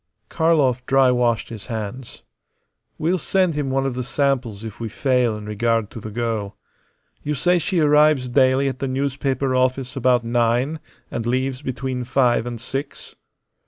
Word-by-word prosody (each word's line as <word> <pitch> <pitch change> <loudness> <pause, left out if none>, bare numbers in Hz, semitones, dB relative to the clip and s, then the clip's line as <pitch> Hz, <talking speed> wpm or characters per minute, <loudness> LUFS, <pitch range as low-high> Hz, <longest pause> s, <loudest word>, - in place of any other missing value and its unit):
Karlov 145 -7 +2
dry 135 -1 +4
washed 120 -2 +1
his 110 -3 -8
hands. 115 +2 -6 0.7
"We'll 175 +4 0
send 185 0 +1
him 145 -2 -2
one 135 0 0
of 135 - -1
the 125 - -3
samples 130 -5 -1
if 110 -3 -8
we 115 -1 -4
fail 125 -2 +1
in 105 - -9
regard 115 0 0
to - - -8
the 110 - -7
girl. 110 -2 -3 0.6
You 150 +1 -2
say 180 +5 +2
she 175 +2 -1
arrives 150 -3 +4
daily 130 +1 +3
at 130 -2 -3
the 135 - -2
newspaper 135 0 -1
office 130 0 0
about 125 -2 +2
nine 120 +6 +1 0.3
and 115 0 -3
leaves 130 +2 -1
between 130 -2 -3
five 125 -2 +2
and 120 -1 -5
six?" 135 +4 -6
130 Hz, 160 wpm, -22 LUFS, 120-140 Hz, 0.7 s, dry